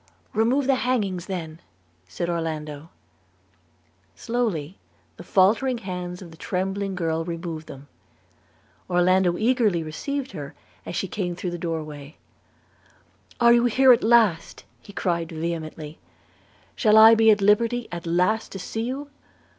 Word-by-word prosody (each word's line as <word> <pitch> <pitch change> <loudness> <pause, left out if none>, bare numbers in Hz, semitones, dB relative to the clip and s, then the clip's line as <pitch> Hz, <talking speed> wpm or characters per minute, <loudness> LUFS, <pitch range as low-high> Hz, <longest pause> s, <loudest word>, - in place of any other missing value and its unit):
'Remove 240 +6 +2
the 270 - +3
hangings 200 -8 -1
then,' 170 -4 -6 0.5
said 90 - -4
Orlando. 160 -2 -4 1.3
Slowly 205 -9 -3 0.4
the - - -10
faltering 230 +7 +2
hands 180 -3 -6
of 170 - -12
the 160 - -14
trembling 195 +2 -3
girl 165 -2 -1
removed 165 -2 -6
them. 140 +1 -11 1.0
Orlando 180 0 +3
eagerly 220 -7 +1
received 270 - -4
her 145 -5 -8 0.3
as - - -5
she 195 - -2
came 180 -2 -3
through 180 0 -4
the 175 - -5
door 165 -2 -3
way. 150 0 -11 1.2
'Are 235 0 +6
you 240 0 +4
here 255 +2 +6
at 235 - 0
last?' 220 -7 +2 0.3
cried 170 0 -1
he 160 - -8
vehemently. 160 -2 -5 0.8
'Shall 215 -3 +4
I 220 +1 +9
be 225 0 +5
at 210 -1 +5
liberty, 230 +4 +2
at 170 -1 -6
last 180 +6 +1
to - - -5
see 225 +4 -5
you? 265 +5 -4
180 Hz, 140 wpm, -24 LUFS, 165-225 Hz, 1.3 s, I